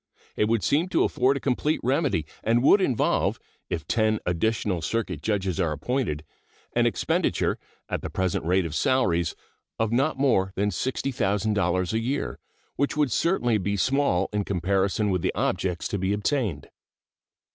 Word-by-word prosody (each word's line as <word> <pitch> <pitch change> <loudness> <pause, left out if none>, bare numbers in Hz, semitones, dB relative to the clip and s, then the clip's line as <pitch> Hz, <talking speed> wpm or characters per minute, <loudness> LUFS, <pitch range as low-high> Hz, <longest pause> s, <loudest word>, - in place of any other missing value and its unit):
It - - +2
would 115 -2 +1
seem 160 +6 +2
to - - +2
afford 130 +2 +2
a - - -4
complete 140 +4 0
remedy, 130 - +1 0.2
and 115 +2 +2
would 195 +8 +6
involve, 130 - +1 0.3
if 80 -2 -3
ten 110 -1 +2
additional 90 +1 0
circuit 95 -4 -2
judges 95 -3 -1
are 85 -4 +1
appointed, 110 - -2 0.5
an - - +3
expenditure, - - 0 0.3
at - - -3
the - - -5
present 95 -2 -1
rate 90 +2 +2
of 80 - -5
salaries, 85 -4 +1 0.4
of 110 -1 0
not 135 +5 +1
more 95 -9 +2
than 105 +1 0
$60,000 100 -6 0
a 110 - +1
year, 115 - -2 0.4
which 140 +2 0
would 145 -4 +2
certainly 120 - +1
be 100 +1 -1
small 130 -6 +2
in 105 -1 0
comparison 100 +2 0
with 90 -2 0
the - - -1
objects 90 -2 -1
to 100 - -2
be 95 +2 0
attained. 105 - -1
105 Hz, 155 wpm, -26 LUFS, 95-130 Hz, 0.5 s, would